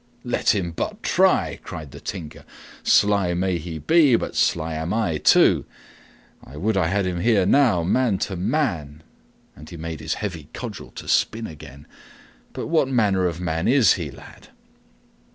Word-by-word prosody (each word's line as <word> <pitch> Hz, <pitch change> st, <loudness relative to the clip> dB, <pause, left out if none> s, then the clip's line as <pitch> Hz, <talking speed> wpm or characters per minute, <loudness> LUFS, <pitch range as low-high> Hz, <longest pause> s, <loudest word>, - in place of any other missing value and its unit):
"Let 120 Hz, -2 st, +1 dB
him 90 Hz, -4 st, -2 dB
but 80 Hz, -, -5 dB
try!" -, -, +2 dB
cried 75 Hz, -3 st, -8 dB
the -, -, -11 dB
Tinker. 85 Hz, -6 st, -7 dB, 0.4 s
"Sly 100 Hz, -4 st, +3 dB
may 90 Hz, -1 st, 0 dB
he 80 Hz, 0 st, -6 dB
be, 150 Hz, -, +4 dB
but -, -, -3 dB
sly 80 Hz, -1 st, +1 dB
am 80 Hz, +2 st, -3 dB
I, 90 Hz, -9 st, 0 dB
too. -, -, +4 dB, 0.8 s
I 70 Hz, -, -12 dB
would 110 Hz, +6 st, 0 dB
I 95 Hz, -4 st, +2 dB
had 100 Hz, +2 st, 0 dB
him 90 Hz, -1 st, -2 dB
here 105 Hz, -2 st, +3 dB
now, 115 Hz, -6 st, +3 dB
man 110 Hz, +3 st, +1 dB
to 95 Hz, -, -6 dB
man!" 85 Hz, -, -2 dB, 0.5 s
And 75 Hz, -, -13 dB
he 85 Hz, -, -9 dB
made 80 Hz, -1 st, -6 dB
his -, -, -3 dB
heavy 85 Hz, -8 st, -6 dB
cudgel -, -, -7 dB
to -, -, -9 dB
spin 115 Hz, 0 st, +1 dB
again. 70 Hz, -, -11 dB, 0.7 s
"But -, -, -5 dB
what 160 Hz, -4 st, +2 dB
manner 105 Hz, -8 st, +2 dB
of 85 Hz, -1 st, -4 dB
man 80 Hz, -1 st, -2 dB
is 130 Hz, -3 st, +5 dB
he, 85 Hz, -6 st, -4 dB
lad? -, -, -14 dB
90 Hz, 170 wpm, -23 LUFS, 80-110 Hz, 0.8 s, is